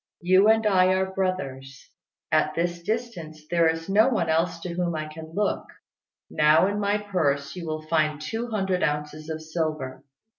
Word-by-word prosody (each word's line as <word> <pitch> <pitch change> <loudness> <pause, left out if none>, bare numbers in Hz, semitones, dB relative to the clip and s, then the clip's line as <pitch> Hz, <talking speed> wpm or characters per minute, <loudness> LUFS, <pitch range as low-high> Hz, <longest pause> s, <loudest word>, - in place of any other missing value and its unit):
You 185 +3 +5
and 220 0 +3
I 185 -3 +4
are 190 0 -1
brothers. 135 -9 -4 0.4
At - - +2
this 175 0 -1
distance 175 -7 -4
there 170 -1 +4
is 165 0 -3
no 210 +5 +4
one 195 -10 0
else 165 +1 +1
to 175 0 -5
whom 175 -1 -1
I 155 0 -3
can 160 +1 -10
look. 205 0 -1 0.6
Now 150 +2 +4
in 205 +1 -1
my 205 0 +1
purse 145 -9 -1
you 175 -2 -6
will 155 0 -4
find 155 -1 0
two 225 +9 -4
hundred 190 -5 -1
ounces 150 +1 -2
of 160 0 -5
silver. 155 -5 -3
170 Hz, 175 wpm, -25 LUFS, 155-190 Hz, 0.6 s, You